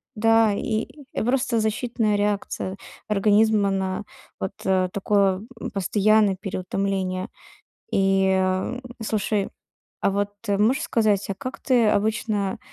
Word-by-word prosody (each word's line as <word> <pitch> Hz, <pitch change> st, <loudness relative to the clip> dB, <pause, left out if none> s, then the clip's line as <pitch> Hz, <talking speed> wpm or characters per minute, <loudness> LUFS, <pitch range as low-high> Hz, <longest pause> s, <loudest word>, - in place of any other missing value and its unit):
Да, 225 Hz, 0 st, +4 dB
и 215 Hz, +2 st, -1 dB, 0.4 s
просто 250 Hz, -1 st, +1 dB
защитная 220 Hz, 0 st, 0 dB
реакция 205 Hz, -2 st, -2 dB, 0.3 s
организма 210 Hz, 0 st, +3 dB
на 190 Hz, 0 st, -2 dB, 0.4 s
вот, 190 Hz, -, -3 dB
э, 185 Hz, -1 st, +2 dB
такое, 200 Hz, -1 st, +2 dB, 0.2 s
м, -, -, -5 dB
постоянное 205 Hz, +1 st, +3 dB
переутомление. 190 Hz, -1 st, -2 dB, 0.6 s
И, 195 Hz, 0 st, +3 dB
ам, 190 Hz, +6 st, 0 dB, 0.2 s
слушай, 210 Hz, -2 st, -1 dB, 0.5 s
а -, -, +2 dB
вот, 205 Hz, +1 st, -1 dB, 0.2 s
э, 200 Hz, -, +2 dB
можешь 245 Hz, +8 st, +2 dB
сказать, 210 Hz, -3 st, +1 dB
а -, -, -1 dB
как 255 Hz, +6 st, -6 dB
ты 245 Hz, -4 st, +3 dB
обычно, 210 Hz, -2 st, 0 dB
205 Hz, 120 wpm, -24 LUFS, 195-220 Hz, 0.6 s, Да